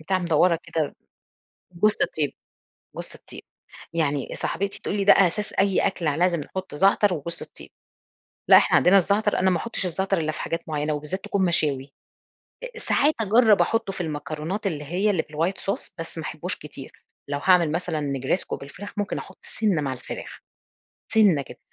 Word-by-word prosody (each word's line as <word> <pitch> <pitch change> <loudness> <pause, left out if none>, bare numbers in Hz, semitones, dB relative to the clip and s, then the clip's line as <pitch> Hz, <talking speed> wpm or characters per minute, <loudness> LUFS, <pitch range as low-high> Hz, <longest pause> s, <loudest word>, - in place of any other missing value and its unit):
بتاعة 185 +4 0
مدوّرة 170 0 +3
كده، 155 -3 -2 0.8
جوزة 210 +4 +2
الطيب، 150 -3 0 0.6
جوزة - - -5
الطيب، - - -8 0.5
يعني 145 -4 0
صاحبتي 200 0 -2
تقول - - -3
لي 200 - 0
ده 200 - +8
أساس 195 +2 +2
أي 195 -1 +2
أكْل، 190 -3 -2
لازم 170 +3 +2
نحط 185 +3 -6
زعتر 195 +3 +4
وجوزة 170 +2 -5
الطيب، - - -12 0.8
لأ - - +9
إحنا - - +4
عندنا 185 +3 +6
الزعتر 205 +3 +2
أنا 190 0 +3
ما 180 - +2
أحطش 230 +1 -3
الزعتر 190 +2 0
إلا 155 -1 0
في - - -6
حاجات 165 - -2
معينة، 150 0 -1
وبالذات 150 +6 -4
تكون 195 -2 0
مشاوي، 145 -5 0 0.8
أ - - -7
ساعات 300 -8 +2
أجرب 220 0 +5
أحطه 225 -4 0
في - - -5
المكرونات 160 +5 -3
اللي 150 -5 -3
هي 180 +8 0
اللي 185 -6 +2
بالwhite 165 +5 -2
sauce - - -5
بس 165 0 -6
ما 160 - -4
احبوش 170 +5 -3
كتير، 140 -3 -10 0.4
لو 145 0 -2
هاعمل 180 -4 +5
مثلًا 165 -1 -2
نجريسكو 140 +4 -1
بالفراخ 180 +9 -9
ممكن 205 -1 -2
أحط 195 - -9
سِنّة 200 -8 0
مع 135 -2 -2
الفراخ، 125 - -8 0.7
سِنّة 195 -10 +5
كده. - - -12
175 Hz, 170 wpm, -24 LUFS, 150-195 Hz, 0.8 s, لأ